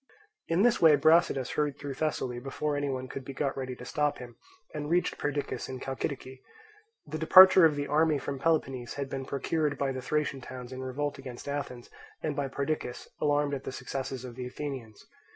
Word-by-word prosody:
In 170 +4 +2
this 240 -1 +3
way 160 -3 +8
Brasidas 155 -3 +3
hurried 150 -2 -1
through 140 -1 -5
Thessaly 130 -4 -2
before 140 +3 -2
any 145 0 -1
one 130 -1 -3
could 135 +1 -6
be 135 - -7
got 140 0 -1
ready 130 -1 -4
to 125 - -10
stop 150 +2 0
him, 120 -2 -10 0.4
and 150 -1 -4
reached 175 +2 +1
Perdiccas 145 -2 -2
and 130 -1 -5
Chalcidice. 130 0 -4 0.7
The 155 +1 -5
departure 185 +2 +9
of 155 -2 +4
the 145 0 -2
army 155 +1 +3
from 140 0 -4
Peloponnese 135 -6 0
had 140 -1 -4
been 135 -1 -3
procured 145 +2 -1
by 135 0 0
the 130 -1 -4
Thracian 150 -1 -1
towns 125 0 -8
in 130 - -6
revolt 135 +2 -3
against 130 -2 -9
Athens 140 -4 -5 0.3
and 150 -2 -1
by 140 -1 -1
Perdiccas, 140 -2 -3
alarmed 145 -1 +2
at 135 -1 -3
the - - -5
successes 130 0 -5
of 125 - -8
the 125 +1 -5
Athenians. 125 -5 -7
140 Hz, 195 wpm, -29 LUFS, 130-150 Hz, 0.7 s, departure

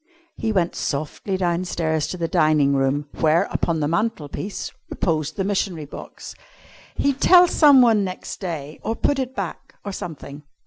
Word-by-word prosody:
He 220 - -2
went 180 -5 +1
softly 155 +7 -3
downstairs 170 -3 -1
to 180 - -5
the 170 -1 -1
dining 155 -3 +3
room, 135 +2 +1
where, 160 +1 +4
upon 165 -2 0
the 145 - +1
mantel 170 -2 -1
piece, 195 +7 -5 0.2
reposed 155 -3 -1
the 195 - -1
missionary 190 -5 -1
box. 140 - -10 0.6
He'd 280 -1 0
tell 360 -1 +7
someone 255 -10 +5
next 185 -1 -6
day, 160 -5 -5
or 225 - -2
put 280 +4 0
it 260 0 -3
back, - - -6
or 200 - -3
something. 150 -5 -7
170 Hz, 160 wpm, -22 LUFS, 155-210 Hz, 0.6 s, tell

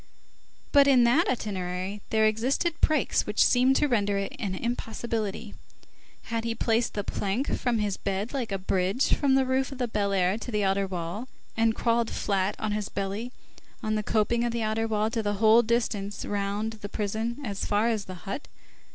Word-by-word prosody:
But 280 -1 +6
in 260 -3 +6
that 245 +9 +4
itinerary 190 -3 -3
there 220 0 +3
existed 245 +10 +1
breaks 310 - +2
which - - +3
seemed 255 +2 +4
to 295 - +3
render 205 -6 +1
it 195 0 -3
an 190 -3 -2
impossibility. 225 -1 -3 0.7
Had 230 0 -3
he 230 0 -2
placed 230 +1 0
the 205 - -1
plank 205 +8 -1
from 245 -2 0
his 205 -2 -1
bed 200 +5 -3
like 250 -6 -2
a 195 - 0
bridge 190 +5 +1
from 275 -2 +3
the 265 -1 +3
roof 260 +1 0
of 270 - -7
the 250 -1 -1
Fine 205 -3 -1
Air 185 +1 +2
to 230 - -7
the 210 -3 0
outer 195 0 +1
wall, 180 +6 -4 0.3
and 225 0 +2
crawled 230 -1 +1
flat, 195 0 0
on 215 -1 -2
his 210 -1 -2
belly 200 +5 -3 0.5
on 215 0 0
the 215 - +1
coping 220 +3 +1
of 240 - 0
the 230 -1 -2
outer 220 +1 0
wall 215 0 0
the 220 -3 -1
whole 220 +3 +6
distance 220 -4 -1
round 205 +2 -2
the 210 -2 -8
prison 220 +3 -2
as 200 -5 -3
far 210 +2 +2
as 220 -4 0
the 185 - -7
hut? 200 +9 -5
220 Hz, 190 wpm, -27 LUFS, 200-235 Hz, 0.7 s, But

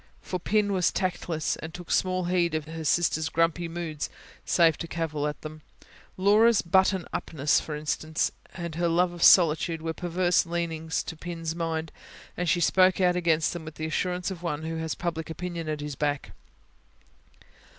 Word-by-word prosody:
For 185 - -3
Pin 205 +2 +1
was 185 -2 +2
tactless, 175 -4 -2
and 160 - -7
took 175 -1 -8
small 185 0 +1
heed 175 -2 +1
of 155 -2 -2
her 160 +1 -6
sister's 160 0 +1
grumpy 165 +1 +1
moods, 165 -3 -4 0.4
save 165 -3 +4
to 165 - -4
cavil 155 -3 -2
at 150 -1 -4
them. 155 0 -8 0.6
Laura's 210 +4 +5
buttoned 190 0 +2
upness, 150 -5 +1
for 155 - -5
instance, 155 +1 -1 0.2
and 170 -2 -5
her 170 +2 0
love 175 +1 +2
of 175 - -9
solitude, 165 -2 +5
were 165 0 -2
perverse 175 +1 +1
leanings 165 -1 -2
to - - -7
Pin's 165 -1 -5
mind; 165 -1 -3 0.4
and 180 -1 -1
she 175 - +2
spoke 185 +3 +4
out 180 -1 +3
against 165 -3 +2
them 175 -2 -6
with 155 0 -9
the 155 - -4
assurance 180 +3 -1
of 180 -3 -7
one 160 -3 -3
who 165 0 -3
has 160 -1 -3
public 165 -2 -3
opinion 170 -1 -5
at 150 -1 -3
his 150 0 -4
back. 145 -1 -2
165 Hz, 175 wpm, -27 LUFS, 160-180 Hz, 0.6 s, Laura's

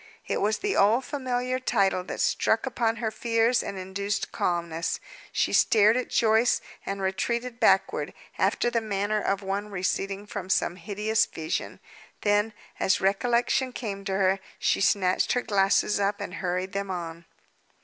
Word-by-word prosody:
It - - -1
was 215 +2 +1
the 410 0 -1
old 225 +6 +4
familiar 255 -2 -2
title 195 -7 +1
that - - -6
struck 225 +3 +2
upon 235 -3 0
her 225 -1 -2
fears 230 +1 +2
and 200 - -5
induced 200 +2 -3
calmness. 170 -1 -1 0.3
She - - 0
stared 215 0 +5
at 255 - -1
Joyce, 225 +1 +3 0.3
and 195 0 -3
retreated 235 +5 -2
backward, - - +2 0.3
after 240 - +2
the 230 - +1
manner 210 0 -1
of 200 0 -1
one 200 +2 -3
receding 195 +1 -2
from 200 -3 -6
some 180 -2 +1
hideous 210 +4 0
vision. 160 +1 -4 0.4
Then, 210 +1 +2 0.3
as 190 - +2
recollection 240 +6 +1
came 200 -5 -5
to 195 - -2
her, 190 0 +2 0.2
she - - +1
snatched 190 -2 +2
her 245 - 0
glasses 200 0 +2
up 200 +1 0
and 200 -3 -5
hurried 185 0 -2
them 200 0 -3
on. 170 -2 -5
205 Hz, 155 wpm, -27 LUFS, 190-230 Hz, 0.4 s, stared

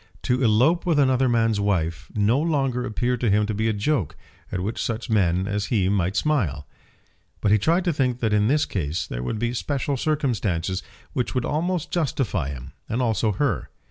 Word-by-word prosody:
To 125 +1 +1
elope 125 +10 +3
with 170 -4 +1
another 130 -2 +3
man's 115 -3 +2
wife 85 -6 -1
no 110 +5 +3
longer 135 -6 0
appeared 120 +3 -1
to 120 - +2
him 105 +1 +3
to 105 - -2
be 110 +2 0
a - - +2
joke 105 - -1 0.4
at 95 - -2
which 105 +6 -3
such 115 +1 -3
men 95 -3 +2
as 105 0 -1
he 95 -6 +1
might 95 -1 0
smile. 105 - 0 0.7
But 100 - +1
he 105 - +5
tried 170 - +2
to 175 - +2
think 125 -3 0
that 110 -3 0
in 105 0 +3
this 150 +4 +2
case 80 -4 -2
there - - -5
would 65 - -3
be 120 +2 -1
special 140 +2 -1
circumstances 105 - -1 0.3
which 125 - -2
would 125 - 0
almost 170 +2 -1
justify 130 - -1
him, 65 0 -8 0.2
and 115 - -1
also 110 -3 +1
her. 115 - -1
115 Hz, 195 wpm, -24 LUFS, 100-135 Hz, 0.7 s, he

